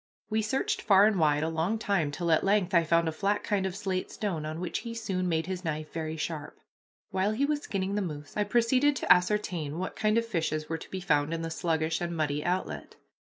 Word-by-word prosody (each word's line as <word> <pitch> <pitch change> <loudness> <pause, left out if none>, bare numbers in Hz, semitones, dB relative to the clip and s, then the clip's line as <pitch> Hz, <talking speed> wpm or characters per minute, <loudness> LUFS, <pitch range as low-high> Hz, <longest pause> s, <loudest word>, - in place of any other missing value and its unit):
We 220 0 +2
searched 375 - -1
far 200 - +6
and 215 -3 +2
wide 150 -1 +3
a - - 0
long 165 +7 0
time 195 -8 0
till 170 +3 -2
at 160 - +4
length 195 -2 +2
I 170 -1 +5
found 165 +1 +2
a - - +1
flat 200 +6 0
kind 195 -2 0
of 190 - -5
slate 190 -2 -2
stone, 170 -8 -3
on 155 +1 -5
which 175 -1 -2
he 230 -1 -6
soon 185 -5 -2
made 160 -1 0
his 185 0 -4
knife 155 -2 -4
very 160 -1 -3
sharp. 155 -1 -4 0.5
While 190 +2 +1
he 265 +6 +1
was 295 0 0
skinning 195 -4 -2
the 205 - 0
moose 150 -5 -6
I 210 - +1
proceeded 255 +6 +3
to - - +6
ascertain 180 -5 -1
what 185 +2 -4
kind 215 +1 +2
of 230 - +2
fishes 160 -7 -2
were 165 0 -3
to - - -11
be 190 - -5
found 150 -3 +1
in 165 - -4
the 165 - -4
sluggish 160 -1 0
and 170 -1 -3
muddy 150 -1 0
outlet. 180 +2 -3
180 Hz, 235 wpm, -29 LUFS, 160-210 Hz, 0.5 s, far